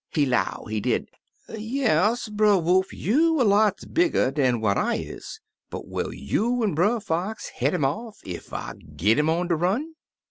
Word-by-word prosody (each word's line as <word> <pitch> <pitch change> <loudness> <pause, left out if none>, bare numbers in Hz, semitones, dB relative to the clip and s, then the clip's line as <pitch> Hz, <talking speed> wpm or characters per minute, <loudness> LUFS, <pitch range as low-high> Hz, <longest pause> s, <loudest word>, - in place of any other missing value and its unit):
He 150 -4 +1
'low, 125 -8 -1
he 110 0 -2
did, - - -1 0.4
*Yes, 220 - 0
Brer 210 -1 +3
Wolf, 185 +2 +2
you 315 - +2
er - - +4
lots 210 -1 +3
bigger 335 - +2
dan 130 -4 +1
what 105 -2 +1
I - - +1
is; - - -7 0.3
but - - -7
will - - -3
you 235 - -1
an' 205 -5 +1
Brer 205 +10 +2
Fox 195 +4 -3
head 135 +4 -1
'im 140 - +1
off 220 - -3
ef 90 -2 -7
I - - -5 0.2
git 105 - +3
'im 150 +1 +2
on 175 +2 0
de 170 - +3
run?' 205 - -1
190 Hz, 180 wpm, -25 LUFS, 145-220 Hz, 0.4 s, er